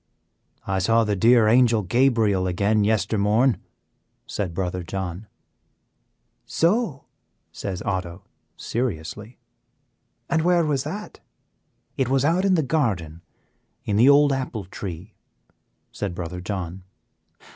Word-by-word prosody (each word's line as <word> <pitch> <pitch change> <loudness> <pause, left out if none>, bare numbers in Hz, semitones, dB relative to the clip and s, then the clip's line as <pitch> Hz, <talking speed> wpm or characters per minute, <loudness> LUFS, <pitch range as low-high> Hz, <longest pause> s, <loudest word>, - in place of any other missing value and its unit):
"I 95 0 -1
saw 115 +4 +3
the 105 -2 0
dear 115 +2 +5
Angel 115 -1 +4
Gabriel 110 -3 +2
again 100 +4 +1
yester 105 0 +1
morn," 110 +2 +2 0.7
said 95 -4 -3
Brother 90 +1 -3
John. 95 +2 -5 1.2
"So!" 170 - 0 0.5
says 95 -3 -5
Otto, 90 -3 -4 0.3
seriously; 110 0 -4 0.9
"and 160 - +1
where 175 0 +3
was 145 -3 -1
that?" 205 +7 -7 0.8
"It 130 -3 0
was 135 +1 +2
out 175 +5 +2
in 190 -1 +4
the 160 - +1
garden, 100 - -1 0.6
in 105 - -1
the 120 +6 +6
old 145 0 +5
apple 125 -6 -4
tree," 95 +1 -8 0.8
said 95 -4 -4
Brother 90 +1 -5
John. 90 -1 -5
110 Hz, 115 wpm, -23 LUFS, 95-135 Hz, 1.2 s, the